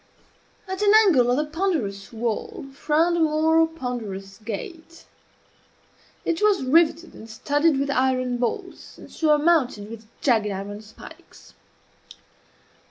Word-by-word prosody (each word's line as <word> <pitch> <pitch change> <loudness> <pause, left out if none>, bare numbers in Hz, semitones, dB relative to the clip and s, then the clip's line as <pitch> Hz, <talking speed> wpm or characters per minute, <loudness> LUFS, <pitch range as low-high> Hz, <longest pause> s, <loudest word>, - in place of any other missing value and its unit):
At 380 +1 -5
an 410 -1 +4
angle 260 -11 +4
of 245 - +2
the 300 - 0
ponderous 300 - -3
wall 230 +2 -4
frowned 320 +5 +1
a - - 0
more 320 +1 +3
ponderous 225 -11 -6
gate. 320 - -8 1.2
It 335 +2 -1
was 420 -7 +3
riveted 325 +4 +2
and 225 - -12
studded 290 +6 +1
with 280 0 -1
iron 255 -2 0
bolts, 240 -1 -5
and - - -14
surmounted 300 -9 +1
with 225 -1 -10
jagged 225 -6 +2
iron 200 +1 -6
spikes. 215 0 -15
280 Hz, 120 wpm, -23 LUFS, 225-325 Hz, 1.2 s, an